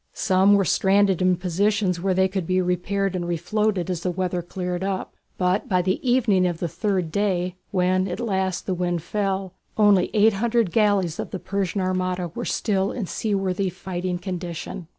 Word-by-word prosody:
Some 195 +1 +4
were 195 -1 +2
stranded 195 0 +3
in 185 0 +4
positions 185 +1 0
where 190 0 +1
they 190 0 +3
could 190 -3 -3
be 185 0 +2
repaired 185 +2 -1
and 175 -1 -2
refloated 180 +3 0
as 180 -3 -3
the 180 - -1
weather 180 0 -2
cleared 180 +1 -4
up; 195 -1 -3 0.2
but 180 +2 0
by 180 -2 +2
the 185 +1 0
evening 235 -8 +3
of 175 -2 -2
the 170 - -2
third 185 -2 -1
day, 185 -2 0 0.2
when 185 +1 +1
at 180 - -4
last 190 -5 -1
the 190 - -1
wind 175 -2 -1
fell, 195 -1 -2 0.2
only 205 -4 +4
eight 215 +1 +5
hundred 230 -1 +1
galleys 200 -6 +2
of - - -3
the - - -4
Persian 195 +1 -2
armada 185 -1 -1
were 165 - -6
still 195 -3 0
in 225 - -3
seaworthy 195 -1 -1
fighting 180 0 -4
condition. 175 -1 -6
185 Hz, 180 wpm, -23 LUFS, 180-200 Hz, 0.2 s, eight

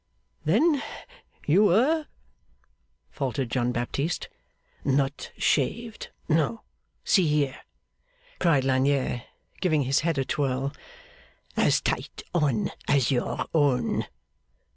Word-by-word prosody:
'Then 315 -4 +3 0.6
you 185 +8 +5
were 275 - +3 0.5
' - - -43
faltered 130 -3 -2
John 125 -1 +1
Baptist. 140 +7 -2 0.5
'Not 140 +1 0
shaved? 225 - 0 0.2
No. 165 +8 +1 0.4
See 185 -5 +4
here!' 150 -3 0 0.8
cried 155 -7 +3
Lagnier, 130 -2 +1 0.3
giving 155 -6 +2
his 135 +2 +2
head 165 -1 0
a 135 - +1
twirl; 135 0 -1 0.8
'as - - +3
tight - - -3
on 140 -10 +1 0.2
as 140 -2 +3
your 125 -2 -1
own. 135 -7 +2
140 Hz, 100 wpm, -26 LUFS, 130-170 Hz, 0.8 s, you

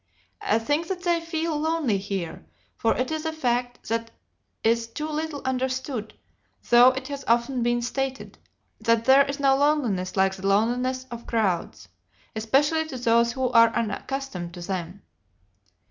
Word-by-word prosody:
I 215 - +2
think 290 +8 -1
that 370 -1 -4
they 345 -2 +1
feel 330 -1 -2
lonely 310 -9 0
here, 195 - -5 0.3
for 225 - +1
it 255 +4 -1
is 315 -1 -2
a 320 - -1
fact 245 -5 -2
that 230 0 -1 0.5
is 230 +1 +2
too 300 +7 -5
little 310 -1 -4
understood, 260 -3 -2 0.6
though 240 +1 +8
it 265 - -5
has 280 -1 -5
often 240 +2 +1
been 240 0 +1
stated, 265 +2 -4 0.4
that 230 0 +2
there 270 +1 +6
is 280 +1 -4
no 270 -1 +4
loneliness 265 -11 0
like 190 0 +3
the 190 0 -4
loneliness 250 +6 +1
of 235 0 -8
crowds, 200 -7 -1 0.5
especially 290 +9 +2
to 265 - -6
those 235 -1 +3
who 260 -1 0
are 230 -1 +7
unaccustomed 225 -5 -3
to 175 - -8
them. 185 +1 -5
245 Hz, 155 wpm, -25 LUFS, 225-280 Hz, 0.6 s, though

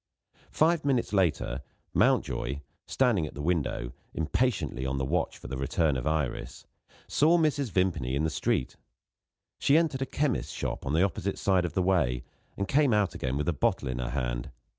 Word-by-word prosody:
Five 160 +1 +2
minutes 130 -6 +1
later, 90 -8 +1 0.3
Mountjoy 70 +3 +1 0.3
(standing 115 -12 +2
at - - -11
the 70 - -5
window, 75 -7 -1 0.2
impatiently 80 - 0
on 65 +1 -1
the 65 - -1
watch 80 +5 -1
for - - -10
the 65 +1 -4
return 75 +2 +1
of 65 +3 -2
Iris) 75 -6 -2 0.4
saw 160 +4 +4
Mrs. 150 -5 +1
Vimpany 90 -9 0
in 70 - 0
the 80 - 0
street. 65 - -1 0.8
She 140 - +4
entered 155 -5 +1
a 135 - -1
chemist's 145 -2 -1
shop, - - -4
on 70 - -1
the 80 +4 +4
opposite 100 0 -1
side 95 -2 +2
of 85 - -4
the 95 - +1
way, 75 -10 +1 0.3
and 100 - -1
came 135 -1 +3
out 105 -2 +2
again 65 +1 -2
with 75 - -2
a 85 - +2
bottle 70 0 0
in 60 -1 -3
her 60 - -2
hand. - - -2
85 Hz, 185 wpm, -28 LUFS, -, 0.8 s, saw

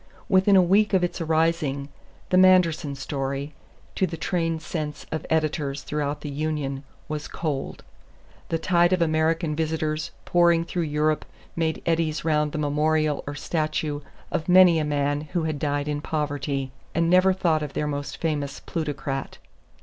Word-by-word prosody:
Within 190 +1 +4
a 185 - +7
week 200 +4 +3
of 185 - +3
its 175 0 -2
arising 160 -3 0 0.4
"the 185 - +4
Manderson 170 -6 +4
story," 135 +1 -4 0.4
to 190 - +1
the 165 -1 -6
trained 165 -1 -1
sense 155 -3 -4
of 160 - -4
editors 150 -3 0
throughout 150 -1 -2
the 150 - -5
Union, 145 -2 -2 0.2
was 150 -1 -4
"cold." 145 -5 -4 0.7
The 165 - +1
tide 175 +1 +3
of 180 - +1
American 160 0 +1
visitors 155 -1 -1 0.2
pouring 170 -1 +4
through 175 0 -2
Europe 150 +1 +1 0.3
made 160 -1 -1
eddies 165 -2 0
round 150 -2 +2
the - - -4
memorial 150 0 +1
or 145 - -4
statue 155 -1 -2 0.3
of 160 - -2
many 180 -2 +7
a - - 0
man 145 -1 0 0.2
who 170 - +1
had 155 -2 -2
died 145 0 -1
in 145 -1 -2
poverty; 145 -3 -2 0.2
and 165 +1 +2
never 185 +2 +5
thought 170 -4 +1
of 150 -2 -5
their 150 - -1
most 145 -1 -4
famous 145 -4 -2
plutocrat. 145 -4 -4
155 Hz, 155 wpm, -25 LUFS, 145-165 Hz, 0.7 s, a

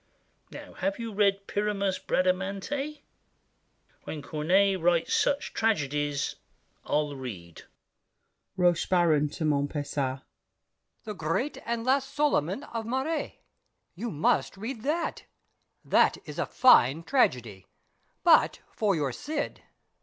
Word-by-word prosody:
Now - - -10
have 295 +1 -2
you 230 -2 -5
read 200 -1 +2
Pyramus, 200 -2 -1
Bradamante? 195 +11 -1 1.0
When 150 -2 -6
Corneille 185 +6 +2
writes 170 -1 +2
such 285 +1 +1
tragedies, 145 -9 0 0.5
I'll 150 -1 -1
read! 95 -11 -8 0.9
ROCHEBARON 175 -4 +3
(to 155 - -4
Montpesat). 140 -2 -1 0.8
"The 215 - -5
Great 185 - -2
and 235 -1 -1
Last 275 +1 +1
Soliman" 275 - +1
of 230 -1 -2
Mairet, 265 +6 -2 0.6
You 235 - -5
must 155 +4 0
read 225 +3 -5
that: 310 +7 -2 0.6
that - - +4
is - - -4
fine 160 - +5
tragedy! 120 - 0 0.6
But - - +5
for 205 -4 +1
your 145 -4 -1
"Cid." 295 - -4
190 Hz, 105 wpm, -28 LUFS, 150-235 Hz, 1.0 s, fine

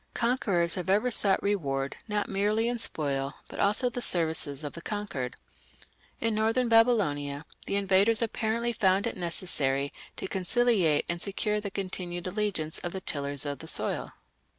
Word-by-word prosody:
Conquerors 200 -8 +1
have 180 0 -1
ever 215 +6 +3
sought 200 -3 +4
reward 140 -9 -1
not 210 -1 0
merely 210 +3 +1
in 240 0 -1
spoil, 140 -7 -1
but - - -9
also 210 +5 +3
the 245 0 -3
services 160 - +1
of 145 - -5
the 170 - -7
conquered. 200 -12 -4 0.8
In 230 -1 +1
northern 225 +3 +1
Babylonia 165 -12 +2 0.2
the - - 0
invaders 200 +3 +3
apparently 230 +1 -1
found 195 -2 +2
it 235 - -2
necessary 145 -6 0 0.2
to - - -4
conciliate 190 -4 +2
and 170 0 -2
secure 210 +1 -1
the 205 - -4
continued 180 -2 -5
allegiance 185 -5 0
of 175 - -5
the 190 - -4
tillers 140 -3 -2
of 145 -1 -4
the - - -9
soil. - - +1
195 Hz, 155 wpm, -28 LUFS, 160-215 Hz, 0.8 s, sought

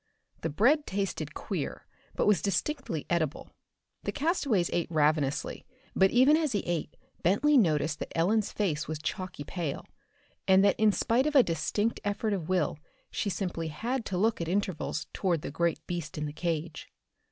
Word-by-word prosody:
The 165 - -1
bread 265 - +3
tasted 195 0 -3
queer - - -4 0.3
but - - +1
was 210 -2 +4
distinctly 200 - -1
edible. 160 -4 -1 0.5
The - - -2
castaways 280 - +1
ate 170 - 0
ravenously, 150 -3 +1 0.3
but 190 - +5
even 260 +7 +5
as 310 -5 +1
he 205 - +1
ate 170 -3 -3 0.2
Bentley 245 - +3
noticed 160 - +3
that - - -6
Ellen's 205 +6 +2
face 170 -7 -1
was 155 - -3
chalky 180 0 -4
pale, 160 -2 -4 0.6
and 190 +1 +6
that 200 - +3
in 215 -1 +5
spite 240 +7 +1
of 305 - -2
a 265 - +8
distinct 205 +6 -1
effort 205 +1 -1
of 180 -4 -3
will 175 -4 +1 0.3
she 205 - -1
simply 175 -4 -3
had 235 - -2
to 185 - -2
look 220 0 +1
at 165 - -2
intervals 185 -4 -1
toward 175 -6 0
the - - -4
great 165 0 -1
beast 170 -1 -5
in 150 - -2
the 145 - -5
cage. 165 0 -3
185 Hz, 170 wpm, -29 LUFS, 160-215 Hz, 0.6 s, a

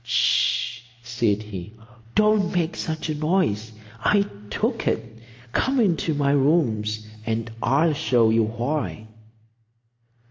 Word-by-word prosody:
"H'sh!" 115 0 +1 0.2
said 115 -3 0
he. 100 -1 -8 0.4
"Don't 215 -3 +3
make 175 -1 0
such 160 0 -3
a 155 - -1
noise. 150 - 0 0.3
I 200 +6 +3 0.2
took - - -1
it. 115 0 -2 0.3
Come 265 - +1
into 170 -7 +1
my 140 -1 +2
rooms, 115 -8 +1 0.2
and 115 0 -2
I'll 150 +6 +3
show 125 -7 +3
you 115 +1 +4
why." 120 +1 -3
135 Hz, 115 wpm, -24 LUFS, 110-160 Hz, 0.4 s, you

